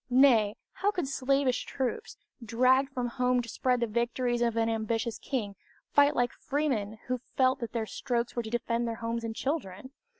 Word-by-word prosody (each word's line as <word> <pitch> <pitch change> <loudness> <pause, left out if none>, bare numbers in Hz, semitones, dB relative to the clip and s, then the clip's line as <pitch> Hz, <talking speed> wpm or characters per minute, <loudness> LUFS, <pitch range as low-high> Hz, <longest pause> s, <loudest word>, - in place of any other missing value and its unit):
Nay, 245 -5 +5 0.2
how 405 - 0
could 360 -8 -2
slavish 275 -1 +1
troops, 265 - -3 0.3
dragged 255 +4 +3
from 250 -2 -2
home 250 +1 +1
to - - -9
spread 250 +2 0
the - - +3
victories 240 +2 -1
of 235 -1 +1
an 225 0 +2
ambitious 225 0 -1
king, 210 -7 -3 0.4
fight 285 0 +5
like 245 0 +2
freemen 245 -8 -1
who 255 0 -1 0.2
felt 260 +1 +3
that 235 -2 -4
their 230 -2 -2
strokes 235 +1 -2
were 240 - 0
to 220 - -7
defend 235 0 -1
their 230 - -2
homes 230 0 -3
and 225 -1 -4
children? 260 - -3
240 Hz, 180 wpm, -29 LUFS, 230-260 Hz, 0.4 s, Nay